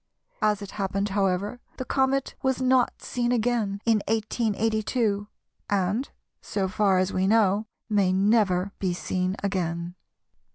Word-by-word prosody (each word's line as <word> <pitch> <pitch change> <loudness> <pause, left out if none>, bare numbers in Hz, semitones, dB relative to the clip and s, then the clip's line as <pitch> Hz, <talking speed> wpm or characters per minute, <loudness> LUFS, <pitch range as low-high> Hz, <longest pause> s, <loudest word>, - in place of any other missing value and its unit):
As 210 -1 +2
it 200 - -8
happened, 195 0 -2
however, 200 +3 0 0.2
the 255 - -4
comet 265 0 +1
was 265 -1 +1
not 255 -1 +2
seen 240 -1 -1
again 225 -4 0
in 225 -2 +3
1882, 220 -1 0 0.4
and, 200 +6 0 0.3
so 195 -2 -2
far 195 0 +2
as 185 +1 +1
we 185 +1 +1
know, 210 0 +3 0.2
may 200 -4 +2
never 195 -1 +2
be 185 -2 0
seen 185 +1 -1
again. 175 -3 -2
205 Hz, 130 wpm, -26 LUFS, 190-225 Hz, 0.4 s, in